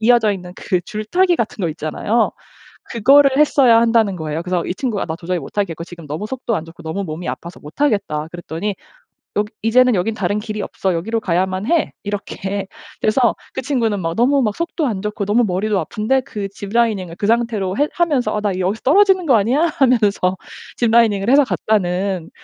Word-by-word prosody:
이어져 225 -2 +4
있는 180 -2 -7
그 185 -3 -1
줄타기 340 - 0
같은 220 -2 -3
거 170 - +1
있잖아요. 170 +9 0 0.6
그거를 275 +5 +5
했어야 265 -6 +5
한다는 225 -4 +2
거예요. 160 -1 -4
그래서 180 -1 -1
이 180 - -2
친구가 230 -5 -2
"나 160 - -4
도저히 180 +1 -3
못하겠고 170 +1 -3
지금 170 -3 -12
너무 155 +8 -4
속도 245 -1 -3
안 160 - -4
좋고 165 +1 -13
너무 160 +5 -3
몸이 160 +1 -6
아파서 170 +1 -6
못하겠다." 155 - -1
그랬더니 175 +3 -4 0.6
"여기 210 +1 -1
이제는 250 +2 +4
여긴 210 +4 0
다른 205 0 -1
길이 210 -1 -5
없어. 190 -2 -2
여기로 225 +7 -2
가야만 185 +1 -1
해." 335 -2 +2
이렇게. 200 -1 -4 0.3
그래서 235 +3 +2 0.2
그 - - -2
친구는 230 -7 0
막 165 -1 -2
너무 270 +4 +3
막 210 -3 -1
속도 335 -2 -2
안 200 -6 -2
좋고 210 -1 -3
너무 225 +4 +3
머리도 200 +1 0
아픈데 245 +5 0
그 205 -4 -5
ziplining을 200 -3 -1
그 200 - -2
상태로 220 -4 0
해 290 +1 +2
하면서 265 -11 +1
'나 205 -2 0
여기서 190 +4 -1
떨어지는 375 +4 +4
거 260 -6 +5
아니야?' 250 +11 +2
하면서 210 -8 +2 0.4
ziplining을 225 -3 +3
해서 285 +2 +6
갔다는 190 -6 -1
210 Hz, 435 characters per minute, -19 LUFS, 185-235 Hz, 0.6 s, 해서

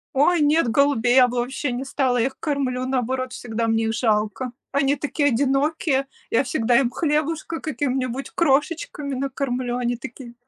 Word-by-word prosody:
Ой, 320 +4 +4
нет, 295 -1 +3
голубей 250 -1 +3
я 255 -1 +7
бы 245 0 -4
вообще 255 +2 -2
не 250 +3 -4
стала, 260 -2 0
я 235 - +2
их 265 - -9
кормлю, 260 -4 -1
наоборот, 255 0 -1
всегда 230 -1 -3
мне 225 0 +1
их 225 - 0
жалко. 220 +1 0 0.2
Они 280 0 +2
такие 290 +1 0
одинокие, 275 +2 +1 0.2
я 230 - +3
всегда 240 -2 +2
им 245 -3 +1
хлебушка, 315 +2 -1
каким-нибудь 265 -3 -2
крошечками 300 - 0
накормлю, 255 -2 -2
они 245 -1 -1
такие 240 0 -9
265 Hz, 160 wpm, -23 LUFS, 245-285 Hz, 0.2 s, я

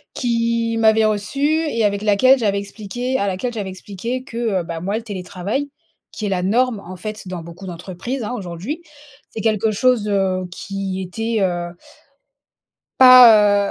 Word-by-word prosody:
qui 230 -1 0
m'avait 220 0 +4
reçu 215 +5 -1
et 300 -6 +1
avec 200 0 0
laquelle 215 +6 +5
j'avais 205 -4 0
expliqué, 215 +5 -4
à 200 - 0
laquelle 215 +7 -3
j'avais 205 -4 -4
expliqué 210 +7 -6
que, 235 - -10 0.2
heu, - - -3
bah, 165 -1 -6
moi 200 +4 -2
le 230 - -4
télétravail, 200 +6 -4 0.4
qui 215 - -5
est - - -1
la 185 -2 -1
norme, 225 +3 +1
en 185 0 -10
fait, 215 -1 -7
dans 180 -2 -5
beaucoup 170 +3 -11
d'entreprises, 185 +8 -5
hein, 225 - -4
aujourd'hui. 195 - -6 0.5
C'est 220 - -6
quelque 220 0 +1
chose, 220 0 +1
heu, 190 -2 0
qui 195 +1 -5
était, 225 +5 -3
heu 175 -2 -1 1.3
pas, 220 -6 +8
210 Hz, 160 wpm, -20 LUFS, 190-235 Hz, 1.3 s, pas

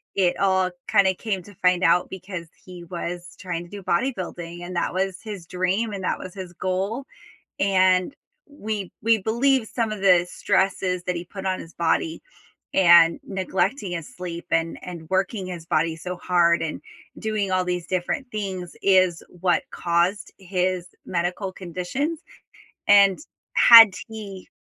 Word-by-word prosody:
it 180 -3 +2
all 190 -1 +2 0.2
kinda 200 -3 +4
came 200 -3 -3
to 205 +1 -15
find 180 0 +2
out, 175 +1 +3
because 185 -2 -7 0.2
he 180 -2 -10
was 175 0 -6
trying 180 -2 -4
to 175 - -14
do 205 +1 -8
bodybuilding; 175 -5 -2
and 180 - -7
that 170 - -1
was 190 0 -1
his 205 -6 -7
dream 185 +5 -1
and 195 -2 -5
that - - -1
was 185 - -8
his 185 -3 -8
goal, 195 +9 -2 0.5
and 185 +2 +3 0.3
we 215 -9 -5
we 225 +1 +4
believe 235 +4 +1
some 225 -1 -2
of 215 - -5
the 180 -2 +5
stresses 185 -2 0
that 180 - -2
he 170 - -5
put 195 +1 -9
on 185 -1 0
his 165 - -12
body, 320 - 0 0.5
and 170 -2 +6
neglecting 190 +2 -1
his 165 -3 -6
sleep, 175 -1 -6
and 165 0 0
and 170 -3 -8
working 190 +1 0
his 175 -3 -7
body 160 +1 +1
so 180 +2 -6
hard, 175 -1 +2
and 160 - -4 0.4
doing 215 -3 -1
all 185 0 +2
these 180 -1 -3
different 185 +9 -2
things 190 -4 -4
is 185 -3 +3 0.2
what 180 -2 +2
caused 175 +4 0
his 185 -1 -2 0.2
medical 180 +2 -2
conditions, 185 - -3 0.7
and 200 0 +6 0.3
had 225 -4 +9
he 205 -4 -9
185 Hz, 155 wpm, -24 LUFS, 175-200 Hz, 0.7 s, had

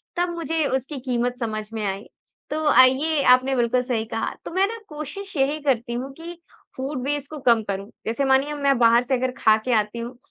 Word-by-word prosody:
तब 350 0 0
मुझे 325 -1 -1
उसकी 265 +2 -3
कीमत 245 -1 -1
समझ 215 -2 -3
में 220 -1 -3
आई। 195 +1 -3 0.5
तो 310 +1 -2
आइए 275 +4 +4
आपने 260 +1 +2
बिल्कुल 245 +1 +2
सही 240 -3 -2
कहा। 225 - -2
तो - - -6
मैं 380 +3 +3
ना 460 +1 -6
कोशिश 310 +7 -7
यही 285 +3 +1
करती 240 -4 0
हूँ 260 +3 -4
कि 335 +4 -9 0.4
फूड 265 0 -3
वेस्ट 290 -1 -2
को 305 - -6
कम 235 -3 +4
करूँ। 200 0 -5 0.2
जैसे 230 +5 -1
मानिए 270 +2 +3
अब 295 - -5
मैं 275 -2 +3
बाहर 235 0 +5
से 260 +1 0
अगर 255 0 -1
खाके 220 +3 +3
आती 210 +3 -4
हूँ 240 +1 -7
260 Hz, 210 wpm, -23 LUFS, 235-290 Hz, 0.5 s, बाहर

